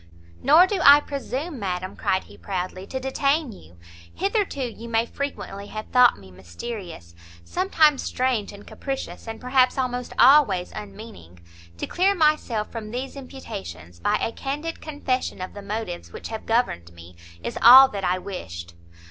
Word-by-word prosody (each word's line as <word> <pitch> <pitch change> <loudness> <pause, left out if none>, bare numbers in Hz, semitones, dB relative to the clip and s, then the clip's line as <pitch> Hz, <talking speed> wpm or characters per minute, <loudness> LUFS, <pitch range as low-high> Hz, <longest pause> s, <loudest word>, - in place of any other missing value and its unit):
"Nor 310 +7 +7
do 385 0 -2
I 285 +1 +9
presume, 280 +1 -5
madam," 185 -2 -4
cried 185 - 0
he - - -16
proudly, 185 0 -5
"to 260 - -4
detain 275 +2 0
you; 85 - -16 0.3
hitherto 390 - -1
you 235 -1 -7
may 225 0 +1
frequently 230 -7 -6
have 215 +1 -7
thought 250 -1 +5
me 95 -2 -15
mysterious, 95 - -8 0.3
sometimes 315 - +2
strange 250 -5 -1
and 205 0 -13
capricious, 270 -3 -6
and 225 0 -6
perhaps 255 +1 +2
almost 250 -1 -2
always, 245 -11 +5
unmeaning; 200 - -11 0.4
to - - -3
clear 385 +3 +1
myself 300 - +1
from 220 -2 -6
these 255 +5 -5
imputations, 90 - -9
by - - +1
a - - -1
candid 295 +7 -5
confession 275 -7 -3
of 185 0 -6
the 205 - -8
motives 200 -3 -5
which - - -8
have 220 -1 -7
governed 225 - 0
me, 85 +1 -14 0.3
is - - -4
all 260 +3 +10
that 200 -4 -5
I 180 0 +1
wished. 85 - -7
230 Hz, 155 wpm, -24 LUFS, 185-275 Hz, 0.4 s, all